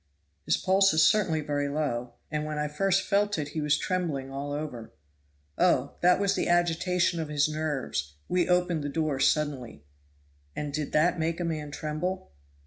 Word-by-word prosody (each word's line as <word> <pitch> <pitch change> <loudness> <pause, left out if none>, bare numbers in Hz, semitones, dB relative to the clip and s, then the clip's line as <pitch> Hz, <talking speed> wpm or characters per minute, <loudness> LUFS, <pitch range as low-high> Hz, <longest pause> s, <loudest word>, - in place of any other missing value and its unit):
"His - - +2
pulse 195 -2 +3
is 160 - +5
certainly 175 -7 +2
very 145 -1 -1
low, 140 -5 -2 0.2
and 150 0 -1
when 155 0 -4
I 150 0 0
first 195 +6 +1
felt 205 0 +2
it 150 -2 -3
he 155 +1 -3
was 150 0 +2
trembling 155 -8 -2
all 140 +1 -4
over." 145 -6 -5 0.7
"Oh, - - +2
that 180 +1 +5
was 200 -1 +2
the - - -1
agitation 175 0 +1
of 160 -2 -3
his 145 -1 +2
nerves 135 - -3
we 180 -1 +1
opened 180 -3 +2
the 145 - -2
door 150 -2 -1
suddenly." 135 - 0 0.7
"And 145 -1 -4
did 150 -1 -3
that 170 +3 +3
make 165 +1 -1
a - - -1
man 155 -3 -3
tremble?" 155 - -4
155 Hz, 175 wpm, -28 LUFS, 145-175 Hz, 0.7 s, is